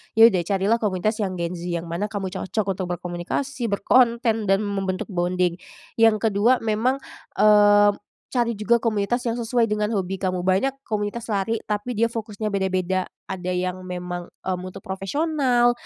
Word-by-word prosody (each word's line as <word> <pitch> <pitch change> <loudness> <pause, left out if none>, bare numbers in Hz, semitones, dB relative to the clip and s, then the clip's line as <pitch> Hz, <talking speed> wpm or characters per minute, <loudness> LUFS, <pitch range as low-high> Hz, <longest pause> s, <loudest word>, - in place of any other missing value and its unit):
ya 225 - +7
udah 215 -5 +7
carilah 200 +3 +2
komunitas 215 +1 -1
yang 190 -3 -1
Gen 170 -1 -2
Z 175 -1 -6
yang 170 -1 -2
mana 170 +4 -3
kamu 200 -3 -4
cocok 195 +1 -2
untuk 185 - -2
berkomunikasi, 180 - -3
berkonten 230 +1 +2
dan 195 +2 +3
membentuk 195 -1 -3
bonding. 180 0 0 0.4
Yang 225 -1 +6 0.2
kedua, 225 +6 +3
memang, 225 +4 +1 0.4
eee, 205 -1 +6 0.4
cari 235 -4 -1
juga 215 +3 +3
komunitas 230 +1 0
yang 235 0 -1
sesuai 230 -1 +1
dengan 210 0 +1
hobi 190 -1 -2
kamu. 185 -2 -1
Banyak 265 +9 +1
komunitas 215 +1 -3
lari 210 +3 -1
tapi 210 +4 -3
dia 230 +2 +1
fokusnya 215 -2 -4
beda-beda, 185 -1 0 0.2
ada 185 -1 -4
yang 185 0 -3
memang, 180 -1 -5 0.2
mmm, 185 -1 -3
untuk 185 - -10
profesional, 245 +4 +1
205 Hz, 160 wpm, -23 LUFS, 185-230 Hz, 0.4 s, ya